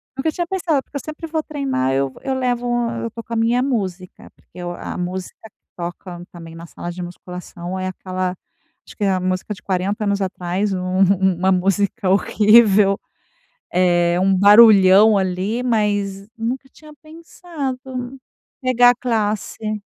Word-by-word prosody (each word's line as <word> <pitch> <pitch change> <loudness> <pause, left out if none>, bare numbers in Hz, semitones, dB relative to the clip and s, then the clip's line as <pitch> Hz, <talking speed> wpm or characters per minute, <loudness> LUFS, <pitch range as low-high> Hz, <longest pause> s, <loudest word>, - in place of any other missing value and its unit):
Nunca 285 +4 -1
tinha 345 +2 -3
pensado, 335 -6 -1
porque - - -22
eu - - -6
sempre 310 +2 -7
vou 320 -1 -2
treinar, 275 - -2
eu 135 0 0
eu 265 -1 -2
levo 245 -2 -1 0.3
eu 230 - -3
tô 230 +1 -9
com 230 - -8
a - - -1
minha 230 +2 +2
música, 190 -9 -4
porque - - -31
eu 175 0 -4
a 175 - -7
música 180 +1 -5
que - - -59 0.2
toca, 175 0 -7
também, 165 -2 -11
na 165 +1 -10
sala 175 - -7
de 180 +1 -7
musculação 180 +1 -7
é 185 - -2
aquela, 185 0 -4 0.5
acho - - -14
que 210 - -4
é 200 - +3
a 185 - 0
música 185 +3 -2
de - - -16
40 195 +3 -1
anos 200 -1 0
atrás, 185 +1 -2
um 185 0 -2 0.2
uma 190 0 +2
música 190 +1 0
horrível. 205 0 +4 0.7
É, 175 -1 +2
um 190 +1 +2
barulhão 205 0 +7
ali, 190 +5 -1
mas, 205 -4 -1
nunca 245 +4 -4
tinha 305 +3 -16
pensado, 270 -6 -7 0.4
pegar 245 -1 +5
a - - +2
classe. 215 -2 -2
200 Hz, 160 wpm, -20 LUFS, 185-245 Hz, 0.7 s, barulhão